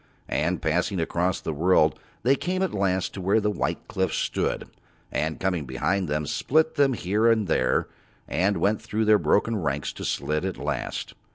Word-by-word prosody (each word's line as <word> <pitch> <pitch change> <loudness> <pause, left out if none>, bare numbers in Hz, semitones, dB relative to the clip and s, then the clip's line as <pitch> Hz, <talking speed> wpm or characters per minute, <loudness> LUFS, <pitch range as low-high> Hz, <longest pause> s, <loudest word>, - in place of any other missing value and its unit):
And 80 +3 0
passing 90 +4 0
across 85 +2 0
the 80 - -4
world 80 -1 +3 0.2
they 130 - +5
came 185 +5 -1
at 190 - -1
last 95 -2 0
to 95 - -6
where 100 +4 +3
the 105 0 0
white - - -2
cliffs 95 0 -1
stood, - - -1 0.4
and, 80 0 -1
coming 90 -5 -1
behind 85 +9 -1
them, 75 +1 -1
split 155 - +1
them 140 -3 +3
here 105 +2 +2
and 110 -2 +2
there 65 -5 +1 0.4
and 95 +3 +1
went 100 +5 +1
through 110 0 -1
their 105 -1 +5
broken 115 +2 +2
ranks 75 -6 -2
to - - -8
Slid 75 +4 -1
at 95 0 -3
last. - - -3
95 Hz, 180 wpm, -25 LUFS, 80-110 Hz, 0.4 s, they